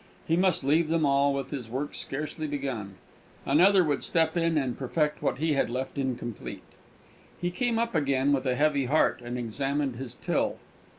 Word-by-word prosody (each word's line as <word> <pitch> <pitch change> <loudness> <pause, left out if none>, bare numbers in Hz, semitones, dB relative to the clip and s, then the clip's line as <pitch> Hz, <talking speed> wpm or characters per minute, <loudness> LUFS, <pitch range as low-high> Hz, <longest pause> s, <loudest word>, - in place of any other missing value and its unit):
He 165 - +3
must 180 -3 +2
leave 155 +4 +3
them 165 -1 +2
all, 140 0 +3
with 135 -1 -3
his 130 -6 -5
work 135 +5 -3
scarcely 155 +3 -4
begun! 130 -9 -4 0.5
Another 185 +7 +5
would 145 -4 0
step 160 -1 +1
in 165 -2 +2
and 130 -4 0
perfect 150 +3 -1
what - - 0
he 155 +2 +1
had 140 - +1
left 130 +2 -3
incomplete! 125 -4 -4 0.8
He 175 0 -1
came 235 +5 0
up 235 0 0
again, 140 -3 +2
with 135 -1 0
a 125 - +2
heavy 145 -1 +2
heart, 145 -1 +2
and 120 +1 -4
examined 135 +2 -2
his 130 -1 -6
till. - - -1
140 Hz, 180 wpm, -28 LUFS, 130-160 Hz, 0.8 s, Another